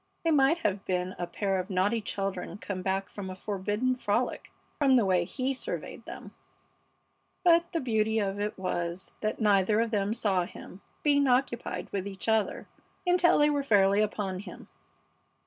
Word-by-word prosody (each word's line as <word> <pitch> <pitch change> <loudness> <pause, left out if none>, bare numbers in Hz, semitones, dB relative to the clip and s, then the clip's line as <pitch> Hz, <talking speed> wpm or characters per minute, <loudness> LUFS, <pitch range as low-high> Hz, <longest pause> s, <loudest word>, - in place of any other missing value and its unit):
They 330 - +2
might 280 +2 +4
have 200 -1 0
been 180 0 -1
a 175 - -2
pair 195 +2 -1
of 185 - -4
naughty 200 +4 +1
children 195 -3 -3
come 200 -3 -5
back 190 +1 -1
from 195 -2 -7
a 185 - -6
forbidden 205 +6 -1
frolic, 245 +1 -1 0.3
from 275 -3 +5
the 235 -5 +4
way 180 -2 +2
he 260 +7 -2
surveyed 260 - -6
them. - - -9 1.1
But 340 -1 +4
the 330 - -1
beauty 220 -3 +1
of 200 -2 -1
it 210 +1 -2
was 175 -1 -3
that 215 0 -2
neither 210 -1 +3
of 230 0 0
them 205 0 0
saw 195 -6 +1
him, 185 +2 -11 0.2
being 285 -2 +4
occupied 250 -1 0
with 200 -1 -2
each 195 +1 -7
other, 220 -2 +1 0.4
until 355 -1 +4
they 295 0 +4
were 290 -1 +1
fairly 205 -5 +4
upon 200 -3 -2
him. 205 - -10
205 Hz, 170 wpm, -29 LUFS, 190-250 Hz, 1.1 s, from